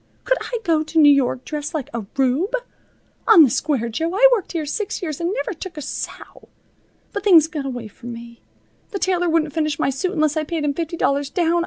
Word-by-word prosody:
Could - - +1
I 485 - -3
go 325 -4 +2
to 315 +1 -4
New 295 -2 +8
York 260 -2 +1
dressed 300 +1 -5
like 280 -4 -3
a 225 -4 -4
rube? 275 - +1 0.7
On 400 -8 +9
the 265 - +3
square, 275 -7 0
Jo, 320 +9 -2
I - - +7
worked 440 -7 0
here 325 -3 -2
six 385 +6 -3
years 310 -2 -4
and 340 +2 0
never 460 0 -2
took 350 0 -9
a - - -4
sou. - - -7 0.7
But 410 - -3
things 340 -7 +6
got 300 -4 -5
away 245 -4 -5
from 235 +3 -10
me. 235 0 -10 0.5
The 400 - -4
tailor 355 -2 +1
wouldn't 315 -3 +1
finish 305 -2 -1
my - - +1
suit 360 +8 -2
unless 310 -3 +1
I 310 - 0
paid 315 0 -3
him 290 -1 0
fifty 335 +2 -4
dollars 280 -2 0
down. 340 +2 +1
310 Hz, 220 wpm, -21 LUFS, 280-350 Hz, 0.7 s, On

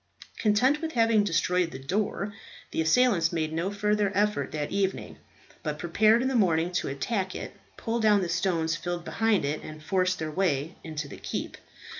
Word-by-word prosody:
Content 250 +8 +3
with 320 -1 -3
having 225 -3 +4
destroyed 180 -1 +1
the 130 - -8
door, 200 +7 -2 0.4
the - - 0
assailants 170 0 +3
made 160 -2 -2
no 165 +4 -1
further 210 0 +1
effort 210 +1 +1
that 150 -1 -3
evening, 195 -1 -2 0.4
but - - -3
prepared 220 +3 +3
in - - +1
the 265 - -1
morning 175 -7 +2
to 180 - -1
attack 185 - -2
it, - - -6 0.2
pull 230 0 -2
down 210 -3 +4
the - - -1
stones 170 -2 0
filled 175 0 -4
behind 225 -8 +1
it, 145 +2 -2
and 155 0 -10
force 185 +1 +1
their 155 -2 -4
way 160 -3 0
into 155 -2 -5
the - - -10
keep. - - -5
185 Hz, 180 wpm, -27 LUFS, 160-210 Hz, 0.4 s, having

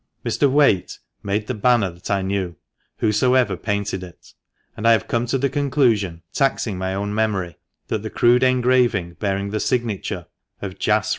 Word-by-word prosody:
Mr. 140 - +2
Whaite 135 -10 +3 0.2
made 105 +1 -1
the 130 - -3
banner, 115 -3 +2
that 85 +1 -11
I 100 -1 +1
knew, 95 -2 -2 0.4
whosoever 115 0 +2
painted 100 0 -2
it; 90 -2 -13 0.4
and 110 - -1
I 115 - +7
have 110 - 0
come 120 +1 0
to 135 - +1
the 140 +2 +1
conclusion, 125 - +1
taxing 130 -6 0
my 95 0 -2
own 100 +1 -2
memory, 100 -6 -1 0.3
that 110 - -2
the 110 - -5
crude 120 +2 +3
engraving 125 -8 +2
bearing 100 -1 -1
the 110 - -1
signature 115 -4 -2 0.3
of - - -7
Jas. - - +2
105 Hz, 165 wpm, -21 LUFS, 95-125 Hz, 0.4 s, I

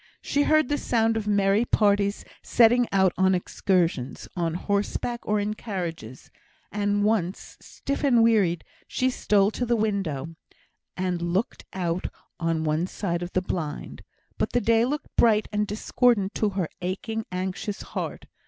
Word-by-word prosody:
She 285 - +1
heard 310 -1 +3
the 290 +2 0
sound 225 -1 +1
of 220 -2 -2
merry 200 +1 +3
parties 205 -3 +2 0.2
setting 240 +1 +4
out 190 -2 +3
on 190 0 +4
excursions, 175 -7 -1
on 170 -2 -1
horseback 205 +5 -1
or 210 0 +2
in 205 +1 -1
carriages; 170 - -6 0.4
and 205 0 0
once, 205 -4 -1
stiff 280 +1 -5
and 240 -5 +5
wearied, 200 -8 +3 0.2
she 255 0 0
stole 205 -4 +2
to 250 - -3
the 240 0 +2
window, 190 -8 -2 0.6
and 180 -2 -1
looked 175 +6 -2
out 180 -1 -2 0.3
on 165 -2 0
one 155 +3 0
side 175 -3 -3
of 175 +1 -6
the 185 - +1
blind; 160 -5 -4 0.4
but - - -1
the 245 - +2
day 225 +2 +3
looked 295 +4 -4
bright 215 -2 +4
and 210 0 0
discordant 215 -1 +1
to 215 - +1
her 190 -4 -2
aching, 220 +5 -3
anxious 190 +3 -3
heart. - - -5
200 Hz, 155 wpm, -25 LUFS, 180-225 Hz, 0.6 s, and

